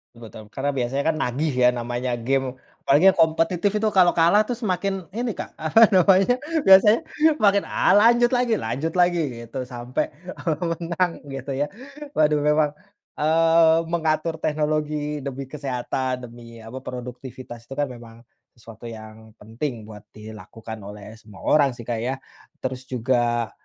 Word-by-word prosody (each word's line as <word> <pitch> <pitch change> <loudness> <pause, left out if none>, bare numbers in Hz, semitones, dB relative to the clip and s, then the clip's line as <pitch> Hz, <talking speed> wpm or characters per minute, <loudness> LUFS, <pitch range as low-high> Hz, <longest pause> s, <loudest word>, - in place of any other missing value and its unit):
Ah, - - -16
betul 110 -1 -11
Karena 140 +5 -3
biasanya 135 +1 -2
kan - - -6
nagih 145 +5 -1
ya, - - +7
namanya 120 +1 -3
gim, 130 +2 -1 0.3
apalagi 160 +8 +6
yang - - -11
kompetitif 165 +4 +2
itu 215 +1 +1
kalau 185 -3 +4
kalah 170 +5 +5
tuh 245 - -2
semakin 195 -4 -3
ini, 235 +1 -3
Kak, - - -7
apa 160 +8 +3
namanya, 195 +6 +4 0.2
biasanya 195 +3 +7 0.4
makin, 200 -1 +4
ah, - - +2
lanjut 240 +3 +5
lagi 245 -3 +2
lanjut 140 - -3
lagi 175 -1 +3 0.2
gitu, 125 +2 -6
sampai, 125 0 -3 0.2
eee, 165 -2 -3
menang 170 +1 -1 0.2
gitu 135 0 -6
ya. 140 +2 -1 0.5
Waduh, 150 -1 +3
memang, 150 0 +2 0.5
eee, 165 +1 +4
mengatur 160 -1 0
teknologi 150 -1 -1
demi 135 -1 -6
kesehatan, 130 -2 -3
demi 115 -1 -13
apa, 115 +4 -8
produktivitas, 125 -1 -9
itu 135 - -8
kan 145 0 0
memang 115 -1 -13 0.3
sesuatu 115 0 -12
yang 110 0 -12
penting 115 +2 -5
buat 105 -1 -11
dilakukan 110 +1 -10
oleh 105 +1 -10
semua 105 -4 -15
orang 140 -4 +3
sih, 120 - -10
Kak, 115 -1 -3
ya. 125 +3 -2 0.5
Terus 130 0 -5
juga 120 -2 0
140 Hz, 150 wpm, -23 LUFS, 120-165 Hz, 0.5 s, ya